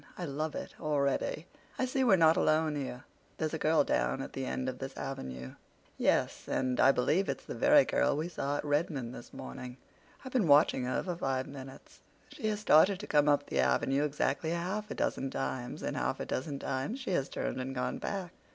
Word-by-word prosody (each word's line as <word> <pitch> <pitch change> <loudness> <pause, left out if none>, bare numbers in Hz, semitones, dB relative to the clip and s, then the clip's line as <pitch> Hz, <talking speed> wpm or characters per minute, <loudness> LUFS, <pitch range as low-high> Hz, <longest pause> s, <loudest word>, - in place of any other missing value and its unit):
I 180 - -3
love 155 +1 -3
it - - -6
already. 150 0 0 0.3
I 260 - +1
see 260 +1 0
we're 235 -7 +6
not 165 -2 +5
alone 155 0 +2
here—there's 145 +3 -6
a 160 - -2
girl 155 0 +4
down 135 - 0
at - - -9
the 135 -1 -3
end 130 - -2
of 130 -1 -4
this 135 0 -6
avenue." 65 - -6 0.4
"Yes, - - +1
and 130 -1 0
I 135 - +7
believe 150 +10 +1
it's - - -3
the - - -5
very 290 0 +5
girl - - +1
we 155 +3 -1
saw 145 -4 -2
at - - -4
Redmond 145 -5 -1
this - - -10
morning. 65 - -8 0.5
I've 260 - -6
been 230 -9 +2
watching 145 -3 +5
her 125 - -1
for 180 -2 -3
five 130 -4 -1
minutes. 135 -1 -11 0.3
She 290 -7 -4
has 210 -1 -1
started 190 0 +5
to 210 - -6
come 150 -4 +3
up 145 - +3
the - - -2
avenue 65 - +2
exactly 150 +1 0
half 185 +6 -2
a - - -4
dozen 135 - -1
times, 130 -2 -4
and - - -2
half 60 +2 -1
a - - -3
dozen 140 +1 -3
times 140 - -3
has 175 -8 +1
she - - -22
turned 130 - -2
and 135 +1 -5
gone 125 - -2
back. 190 -4 -4
145 Hz, 205 wpm, -31 LUFS, 130-170 Hz, 0.5 s, I